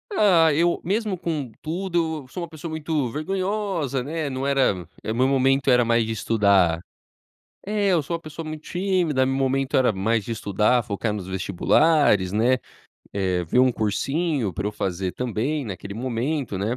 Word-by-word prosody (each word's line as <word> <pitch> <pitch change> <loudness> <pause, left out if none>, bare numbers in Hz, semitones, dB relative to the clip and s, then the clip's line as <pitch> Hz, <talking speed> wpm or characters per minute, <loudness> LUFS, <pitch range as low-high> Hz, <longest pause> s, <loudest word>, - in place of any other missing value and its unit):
Ah, 165 -7 +5
eu 170 +3 +2
mesmo 205 0 -1
com 155 -8 -3
tudo, 165 -2 -2
eu - - -17
sou 180 - -6
uma - - -5
pessoa 160 +1 -8
muito 155 -5 -2
vergonhosa, 185 - -2
né, 155 +2 -3
não 130 +1 -3
era, 125 - +1 0.2
eh, - - -3
meu 125 +4 +2
momento, 135 0 +2
era 125 -1 +5
mais 115 0 +2
de 115 - -3
estudar 100 -6 +3 0.9
É, 205 -1 0
eu 175 -4 +3
sou 170 +4 -3
uma - - -18
pessoa 155 0 -8
muito 155 0 -7
tímida, 175 -7 +1
meu 135 - 0
momento 135 0 +1
era 130 -3 +4
mais 105 +2 0
de 115 - -5
estudar, 105 +3 +1
focar 105 +1 -2
nos 100 -3 -5
vestibulares, 95 - +2
né, 120 +4 +3 0.6
eh, 95 -3 0
ver 85 +9 0
um 130 0 +5
cursinho 130 - -1
pra 100 +4 -3
eu 105 - -2
fazer 95 -2 -2
também 125 +5 -2
naquele 100 -2 -7
momento, 125 0 -2
né. 110 +6 -1
130 Hz, 175 wpm, -24 LUFS, 110-160 Hz, 0.9 s, Ah